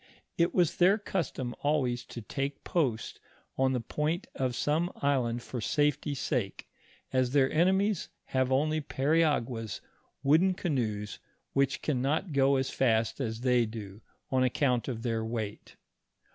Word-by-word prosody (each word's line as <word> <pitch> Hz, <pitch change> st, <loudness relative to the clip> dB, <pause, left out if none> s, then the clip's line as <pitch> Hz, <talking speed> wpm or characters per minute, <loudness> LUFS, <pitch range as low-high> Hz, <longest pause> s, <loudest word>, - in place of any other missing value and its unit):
It 170 Hz, -1 st, +2 dB
was 175 Hz, -4 st, +2 dB
their 185 Hz, +4 st, +5 dB
custom 165 Hz, -, -3 dB
always 135 Hz, -5 st, +1 dB
to 120 Hz, -, -8 dB
take 140 Hz, +5 st, -4 dB
post 130 Hz, -11 st, -1 dB, 0.4 s
on 130 Hz, 0 st, +2 dB
the 125 Hz, -, 0 dB
point 150 Hz, -, -2 dB
of 130 Hz, -2 st, -1 dB
some 160 Hz, +7 st, +1 dB
island 120 Hz, -4 st, 0 dB
for 125 Hz, -, -5 dB
safety 145 Hz, +3 st, +1 dB
sake, 125 Hz, -7 st, -2 dB, 0.5 s
as 130 Hz, -1 st, +2 dB
their 135 Hz, -2 st, +4 dB
enemies 190 Hz, +4 st, +2 dB, 0.2 s
have 130 Hz, 0 st, +2 dB
only 155 Hz, +4 st, +2 dB
periaguas, 135 Hz, -, 0 dB, 0.4 s
wooden 170 Hz, +7 st, +4 dB
canoes, 110 Hz, -, -2 dB, 0.3 s
which 140 Hz, 0 st, +1 dB
can 135 Hz, -5 st, 0 dB
not 155 Hz, +5 st, 0 dB
go 140 Hz, 0 st, +4 dB
as 130 Hz, 0 st, 0 dB
fast 115 Hz, -2 st, +1 dB
as 110 Hz, -2 st, -3 dB
they 125 Hz, -2 st, +3 dB
do, 105 Hz, -2 st, -8 dB, 0.3 s
on 130 Hz, -1 st, +3 dB
ac 125 Hz, -, +1 dB
count 125 Hz, -5 st, +1 dB
of 115 Hz, -4 st, -4 dB
their 115 Hz, -2 st, -1 dB
weight. 110 Hz, -2 st, -5 dB
135 Hz, 145 wpm, -30 LUFS, 120-150 Hz, 0.5 s, their